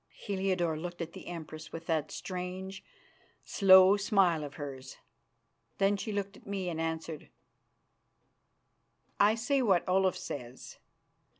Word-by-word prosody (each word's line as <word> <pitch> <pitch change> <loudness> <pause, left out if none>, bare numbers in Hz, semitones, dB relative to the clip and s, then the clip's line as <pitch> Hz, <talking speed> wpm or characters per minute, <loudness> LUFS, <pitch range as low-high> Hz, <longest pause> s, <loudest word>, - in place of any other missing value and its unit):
Heliodore 185 -5 -1
looked 175 +1 -6
at 170 -1 -5
the - - -10
Empress 155 -2 -8
with 165 0 -7
that 160 -2 0
strange, 185 +1 -6 0.6
slow 190 0 +7
smile 195 -6 +2
of 145 -1 -8
hers. 135 -3 -8 0.8
Then 200 +1 +3
she 215 +2 -4
looked 200 -1 -3
at - - -17
me, 195 -2 -2
and 165 -1 -3
answered: 160 -1 -4 1.9
"I 210 +2 +5
say 265 +4 +1
what 195 -8 +2
Olaf 185 0 +3
says. 125 -2 -8
180 Hz, 125 wpm, -31 LUFS, 160-195 Hz, 1.9 s, slow